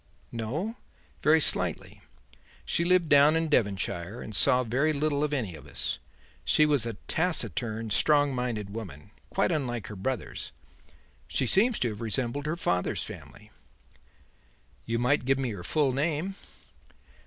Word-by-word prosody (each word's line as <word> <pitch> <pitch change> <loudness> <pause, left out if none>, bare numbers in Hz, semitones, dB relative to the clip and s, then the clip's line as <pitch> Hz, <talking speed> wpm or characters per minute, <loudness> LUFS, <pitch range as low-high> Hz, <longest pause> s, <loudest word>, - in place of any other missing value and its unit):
"No; 150 - -3 0.4
very 155 +1 +5
slightly. - - 0 0.6
She 170 - +1
lived 180 -1 +3
down 145 +1 +6
in 165 -1 0
Devonshire 100 - 0
and 110 - -6
saw 125 +5 +4
very 135 +7 +1
little 145 0 0
of 150 - 0
any 120 -11 -1
of 75 -4 -12
us. - - -3 0.4
She 155 - +4
was 145 -6 +2
a 115 - -4
taciturn, 115 - -1
strong 145 +4 +3
minded 120 -5 -3
woman; 95 -6 -8 0.2
quite 195 - +1
unlike 125 - -2
her 105 - -7
brothers. 120 +7 -4 0.7
She 130 - 0
seems 215 - +4
to 120 - 0
have 105 0 -7
resembled 120 +6 -2
her 160 +3 -1
father's 90 - 0
family." - - -11 1.3
"You 115 0 -1
might 125 +5 +2
give 135 +1 +3
me 130 -3 -1
her 95 -4 -7
full 145 - +1
name." 155 +6 -1
130 Hz, 145 wpm, -28 LUFS, 110-155 Hz, 1.3 s, down